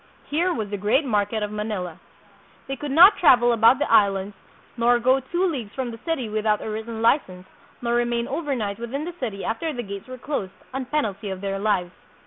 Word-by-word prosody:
Here 340 +5 0
was 215 - -3
the 205 - -2
great 240 +9 +2
market 210 -2 0
of 210 - -3
Manila. 210 -6 -4 0.7
They 270 - -3
could 290 +2 -6
not 350 +9 +7
travel 240 -7 +5
about 230 +2 +5
the 295 - -1
Islands, 200 -2 +3 0.4
nor 240 0 +3
go 255 +3 +3
two 345 +8 -1
leagues 260 - -3
from 255 -3 -3
the 230 - -9
city 325 -8 -2
without 215 0 0
a - - -7
written 220 +1 -5
license, 185 -8 +1 0.4
nor 235 0 0
remain 240 0 0
over 290 -1 -2
night 205 -3 -3
within 265 +6 -4
the 350 - -5
city 210 -6 -4
after 315 +9 -2
the 245 -4 -5
gates 200 0 -8
were 255 0 -8
closed, 250 -8 -4 0.2
on 265 0 -3
penalty 220 -8 -2
of 190 -1 -5
their 195 0 -3
lives. 195 -4 0
235 Hz, 205 wpm, -24 LUFS, 205-270 Hz, 0.7 s, not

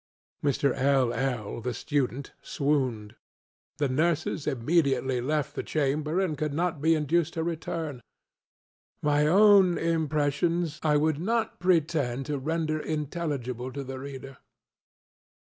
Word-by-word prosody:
Mr. 140 -2 +2
LŌĆöl 130 -4 0
(the 125 0 -3
student) 140 -2 -2
swooned. 130 -7 -1 0.6
The 145 -1 +1
nurses 155 +2 0
immediately 135 -2 +1
left 150 +2 -1
the - - -3
chamber, 150 +3 -1
and 185 -5 0
could 150 -1 -2
not 170 -2 -1
be 160 +1 +4
induced 160 +2 +1
to 160 - -1
return. 160 -4 -4 1.0
My 150 0 +3
own 195 0 +6
impressions 160 0 0
I 150 -2 +3
would 155 0 +1
not 225 +5 -1
pretend 155 -7 +1
to 150 -2 -2
render 155 +2 -1
intelligible 145 -5 -3
to 140 - -4
the 130 0 -6
reader. 135 -1 -8
150 Hz, 120 wpm, -27 LUFS, 135-165 Hz, 1.0 s, own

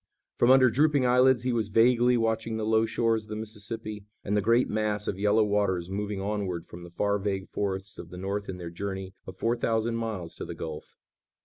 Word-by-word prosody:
From 120 - +3
under 130 -2 +7
drooping 145 +1 +3
eyelids 125 0 +4
he 125 -1 0
was 115 -3 0
vaguely 120 +3 +4
watching 115 0 -1
the 110 - -2
low 110 +1 +3
shores 115 -1 0
of - - -21
the 105 - -4
Mississippi, 110 -1 -6 0.2
and 105 - -1
the 105 - +3
great 115 +4 +3
mass 105 -1 -1
of 95 - -2
yellow 105 +2 +4
waters 100 -4 0
moving 100 0 -3
onward 95 -4 -3
from 85 - -11
the 85 - -10
far 100 +4 0
vague 95 -1 -2
forests 95 -1 -3
of 85 - -8
the 90 - -9
North 100 +2 -3
in 95 - -4
their 85 -2 -7
journey 95 +1 -5
of 95 0 -9
four 115 +1 +1
thousand 115 0 0
miles 105 -7 -4
to - - -5
the - - -7
gulf. 80 -1 -7
105 Hz, 215 wpm, -28 LUFS, 95-115 Hz, 0.2 s, under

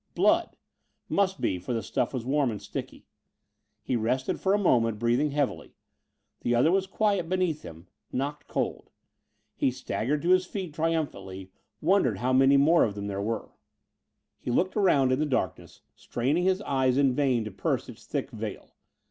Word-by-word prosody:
Blood! - - +2 0.5
Must 195 -1 +1
be, 90 - 0
for 105 +8 -4
the 115 - -2
stuff - - -1
was 125 -3 -4
warm 140 0 +2
and 105 -3 -4
sticky. - - -7 0.8
He 130 - -1
rested 120 +3 0
for 195 +1 +2
a - - +3
moment, 115 - +2
breathing 120 +7 +1
heavily. 145 -2 -2 0.6
The 120 - 0
other 130 +8 +4
was 190 0 +1
quiet 200 -4 0
beneath 180 -4 0
him 80 +1 -11 0.3
knocked 140 +3 -3
cold. - - -3 0.7
He - - +2
staggered 130 +3 -2
to 175 - 0
his 185 0 +4
feet 185 -6 -5
triumphantly; 145 - -3 0.3
wondered 160 - +3
how 125 +5 0
many 135 +2 +6
more 160 +5 +5
of 105 -3 -1
them 100 0 -5
there 100 -1 -3
were. 110 +2 -3 0.9
He - - -6
looked 180 +10 +1
around 145 -11 +3
in 130 - +1
the 155 - +2
darkness, 125 - -3
straining 145 +9 -1
his 190 +2 +1
eyes 130 -2 +1
in 135 -2 +4
vain 130 -4 +1
to 110 - -5
pierce 95 - -2
its - - -12
thick - - -3
veil. - - -7
135 Hz, 175 wpm, -27 LUFS, 120-170 Hz, 0.9 s, many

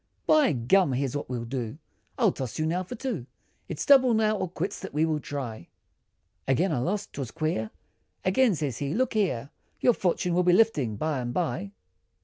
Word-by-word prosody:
"By 305 - +4
gum! 135 +6 +3
here's 135 +1 -1
what 145 - -3
I'll 120 -2 -3
do, 120 0 -4 0.4
I'll - - +4
toss 130 -4 -5
you 155 - 0
now 170 +3 0
for 185 +7 -6
two, 220 - -4 0.4
It's - - -3
double 260 -4 +6
now, 215 0 +2
or 185 -3 -2
quits, 185 +3 -4
that - - -8
we 155 +2 +3
will 155 -2 0
try," 125 - -6 0.8
Again 165 +8 +2
I 145 - 0
lost; 195 +10 -2
'twas 135 -4 -4
queer, 155 -7 -2 0.6
Again, 210 +3 +3
said 145 -4 -2
he, 140 +2 -2
"look 255 0 +1
here, 160 - 0 0.3
Your 245 - +4
fortune, 180 -3 0
will 180 - +3
be 180 0 +4
lifting 160 - +3
by 150 +5 -1
and 120 -1 -3
by." 120 -5 -2
155 Hz, 190 wpm, -27 LUFS, 130-195 Hz, 0.8 s, double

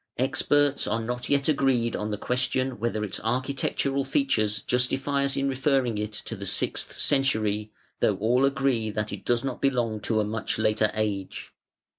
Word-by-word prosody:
Experts 145 +2 +2
are 115 - 0
not 125 +2 -3
yet 140 -1 +2
agreed 135 -6 +2
on 105 - -3
the 105 - -2
question 125 +2 -1
whether 110 -1 -1
its 100 - -3
architectural 135 +3 0
features 110 - 0
justify 135 +3 +1
us 140 - -1
in 135 0 +1
referring 135 -4 +1
it 105 0 -3
to 110 +1 -6
the 100 -1 -6
sixth - - -1
century, 110 -6 +1 0.3
though - - +2
all 120 +5 +2
agree 135 -5 +1
that 105 0 -3
it - - -7
does 120 -1 +1
not 135 - -4
belong 120 -5 +1
to 110 +1 0
a - - +2
much 105 +2 -2
later 110 0 +2
age. 105 -3 -3
120 Hz, 170 wpm, -26 LUFS, 110-135 Hz, 0.3 s, Experts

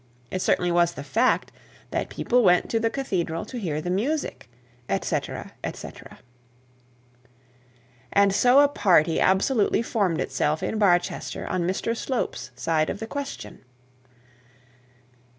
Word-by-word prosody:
It 185 - -2
certainly 180 -1 +2
was 170 0 +3
the 140 - -7
fact, 230 - +1 0.4
that - - -2
people 245 +1 +1
went 180 -5 +3
to 225 - +2
the 225 0 +1
cathedral 185 -11 -2
to 245 +3 -6
hear 155 -7 -2
the 180 - -3
music 210 - -2 0.4
&c 95 - +1 0.8
&c. - - -8 2.2
And 200 -1 +4
so 250 +6 +5
a 290 - +6
party 180 - +3
absolutely 205 +4 +2
formed 195 -8 0
itself 150 +1 -1
in 220 - -2
Barchester 175 -4 +1
on 175 -2 -1
Mr 210 +5 -1
Slope's 235 - -3
side 155 +4 0
of 200 - -4
the 225 - -4
question! 280 +4 -6
190 Hz, 130 wpm, -25 LUFS, 170-230 Hz, 2.2 s, a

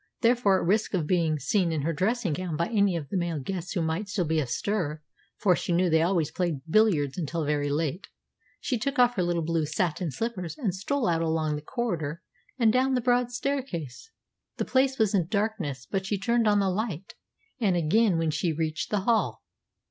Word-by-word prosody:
Therefore, 230 -5 +4
at - - -2
risk 210 +1 +1
of 170 -5 0
being 165 -2 +1
seen 175 +5 +1
in 155 -3 -1
her 165 +2 0
dressing 195 +2 0
gown 170 0 -3
by 170 - +1
any 200 -5 +2
of 150 -5 -4
the 195 - -1
male 170 -2 -1
guests 180 +5 -4
who 175 -5 0
might 160 +6 -2
still 205 -4 0
be 160 0 +1
astir 155 - -2 0.4
for 185 -4 +3
she - - -3
knew 175 0 +2
they 160 0 +4
always 170 -3 +1
played 170 -7 -2
billiards 165 -6 +2
until 165 0 -2
very 145 -1 0
late 155 +4 -2 0.5
she 250 -4 -2
took 275 +4 -2
off 245 -1 +5
her 190 - -1
little 175 -1 0
blue 160 -1 0
satin 170 +2 -1
slippers 185 - -4
and 225 - -1
stole 240 +8 -1
out 165 -1 +1
along 160 -2 0
the 150 - -5
corridor 165 - -3 0.3
and 225 -4 +4
down 260 +1 +2
the - - +2
broad 245 0 +2
staircase. 245 - -4 0.5
The - - -1
place 265 0 +2
was 220 -3 +2
in 180 -5 +2
darkness; 195 - -2
but 190 +4 -3
she 205 - 0
turned 230 +3 +1
on 205 -1 +4
the 195 -1 +1
light, 195 -3 -3 0.5
and 200 -6 +2
again 175 +4 +3
when 165 -1 +1
she 160 +3 0
reached 155 0 -2
the 205 -2 0
hall. 225 +2 +1
180 Hz, 205 wpm, -27 LUFS, 160-220 Hz, 0.5 s, off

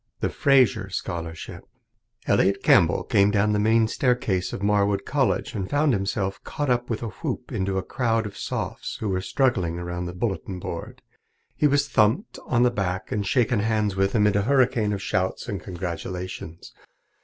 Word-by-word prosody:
The - - 0
Fraser 130 -8 +3
Scholarship 85 -3 -5 0.6
Elliot 100 +1 +2
Campbell - - +4
came 100 0 +3
down 105 0 +2
the 105 - +1
main 110 +1 +3
staircase 110 -7 0
of 100 - -5
Marwood 100 -1 +2
College 140 -3 0
and 95 -3 -3
found 145 -1 +2
himself 95 -1 -2
caught 145 -3 -2
up 120 0 0
with 115 0 -2
a 115 - -3
whoop - - -5
into 95 0 -1
a 95 - -1
crowd 115 0 0
of 105 - -7
Sophs - - -4
who 110 - -2
were 95 -1 0
struggling 95 -8 0
around 85 0 -4
the 90 - -6
bulletin 95 -1 -3
board. 85 -1 -7 0.5
He 150 - +3
was 145 0 +2
thumped 120 - +1
on 120 -1 +3
the 125 - +4
back 95 -4 -3
and 105 - 0
shaken 120 0 +2
hands 105 -2 0
with 95 +2 +1
amid 105 -2 +3
a 100 - +3
hurricane 120 -3 +2
of 100 -1 -3
shouts 95 -2 -1
and 100 -4 -4
congratulations. 90 -1 -6
105 Hz, 175 wpm, -24 LUFS, 95-120 Hz, 0.6 s, Campbell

